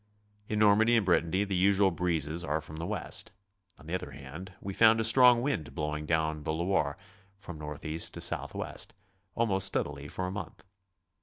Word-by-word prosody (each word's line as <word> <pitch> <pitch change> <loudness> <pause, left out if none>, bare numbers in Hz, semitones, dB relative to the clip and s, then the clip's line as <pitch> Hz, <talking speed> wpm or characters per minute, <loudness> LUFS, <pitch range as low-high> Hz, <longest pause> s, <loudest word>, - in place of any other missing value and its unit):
In 105 - -1
Normandy 110 +3 +5
and 110 - +1
Brittany 90 +2 +2
the 100 -2 -2
usual 95 +1 +4
breezes 85 -1 -1
are 80 -1 -1
from 80 0 -10
the 85 +1 -4
west. 105 -1 -4 0.5
On 75 - -17
the 80 - -6
other 90 -5 -3
hand, 70 +7 -9
we 100 - -6
found 110 +2 +5
a - - +1
strong 120 +1 +6
wdnd 130 - -2
blowing 75 -1 -3
down 80 -1 0
the 80 - -2
Loire, 85 -4 0 0.4
from 90 -5 -9
north 75 0 -7
east 80 +1 -1
to - - -6
southwest, - - -2 0.4
almost 95 -5 +1
steadily 70 -6 -2
for 95 - -4
a 90 - -3
month. 95 -5 -7
90 Hz, 180 wpm, -30 LUFS, 75-100 Hz, 0.5 s, strong